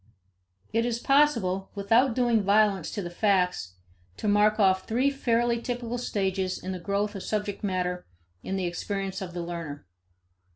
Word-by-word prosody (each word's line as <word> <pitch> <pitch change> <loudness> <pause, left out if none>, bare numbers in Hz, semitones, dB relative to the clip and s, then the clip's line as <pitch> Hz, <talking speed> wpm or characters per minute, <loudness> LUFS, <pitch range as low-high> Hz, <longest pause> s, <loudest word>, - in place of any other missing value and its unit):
It 230 +1 +2
is 235 -1 -1
possible, 235 -9 +2
without 225 +5 +3
doing 240 -3 +3
violence 200 -3 +3
to 205 - -4
the 175 - -6
facts, 180 - +1 0.4
to - - -3
mark 210 +1 +3
off 190 -2 +3
three 255 +5 +2
fairly 235 -3 +1
typical 245 0 -3
stages 190 -5 -1
in 185 - -6
the 185 - -4
growth 200 +3 -1
of 195 - -6
subject 210 0 -3
matter 180 -2 -2 0.3
in 190 - -4
the 190 -1 -1
experience 195 +2 -3
of 180 -2 -6
the 175 - -3
learner. 165 - -6
200 Hz, 160 wpm, -27 LUFS, 185-230 Hz, 0.4 s, without